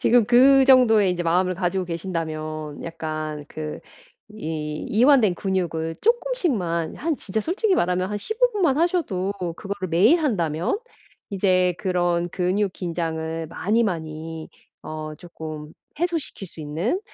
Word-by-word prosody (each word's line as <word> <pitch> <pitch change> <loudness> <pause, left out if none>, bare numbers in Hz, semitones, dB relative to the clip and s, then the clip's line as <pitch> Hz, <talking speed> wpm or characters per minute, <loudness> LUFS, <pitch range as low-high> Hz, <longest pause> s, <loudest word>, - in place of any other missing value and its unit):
지금 240 -1 +5
그 265 +3 +6
정도의 225 -7 +5
이제 175 -1 -2
마음을 180 +2 +2
가지고 185 +1 -1
계신다면 155 -3 -4
약간 155 -2 -4
그 155 -1 -6 0.5
이 155 -6 -4
이완된 235 -4 +5
근육을 170 -4 -2
쪼끔씩만 285 - 0
한 325 +1 -1
진짜 220 +2 -2
솔직히 385 - +1
말하면 180 - +1
한 210 - -2
15 445 - +1
분만 335 -9 +2
하셔도 315 - 0 0.2
그거를 195 0 -5
매일 185 - +5
한다면 175 - 0 0.5
이제 185 -2 +2
그런 175 -2 0
근육 190 +2 0
긴장을 165 -2 -3
많이 210 +8 +1
많이 160 -3 -4 0.3
어 155 0 -6
쪼끔 155 -2 -8 0.3
해소시킬 330 - -2
수 165 - -12
있는 165 - -1
180 Hz, 275 characters per minute, -23 LUFS, 160-225 Hz, 0.5 s, 그